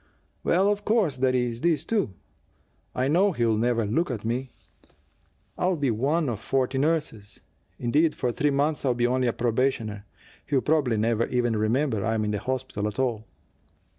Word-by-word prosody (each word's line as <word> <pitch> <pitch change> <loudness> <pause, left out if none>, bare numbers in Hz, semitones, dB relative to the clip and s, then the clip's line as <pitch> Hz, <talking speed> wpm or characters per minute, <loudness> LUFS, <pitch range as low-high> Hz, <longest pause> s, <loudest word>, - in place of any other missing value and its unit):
"Well, 190 +3 +3
of 205 0 -2
course, 210 - +1
there's 125 -2 0
this, 160 -3 +1
too. 195 - -1 0.8
I 130 +1 +1
know 185 +7 +3
he'll 115 -5 +1
never 115 0 +1
look 155 +12 0
at 110 -4 -4
me. 125 +3 -2 1.1
I'll 180 0 +2
be 140 -5 0
one 145 +8 0
of 115 -5 -2
forty 130 +3 0
nurses; 145 -9 -2 0.4
indeed, 150 +7 +2
for 125 - -1
three 145 +5 +1
months 145 +2 0
I'll 130 -3 +1
be 120 0 +1
only 125 +1 +1
a 120 - +1
probationer. 115 -3 -1 0.4
He'll 140 -3 +2
probably 145 -7 +1
never 115 +1 +1
even 120 -2 0
remember 110 +1 0
I'm 110 +1 0
in 105 - -1
the 105 - -2
hospital 130 -3 -3
at 105 - -6
all." 120 -5 -1
125 Hz, 165 wpm, -26 LUFS, 115-145 Hz, 1.1 s, Well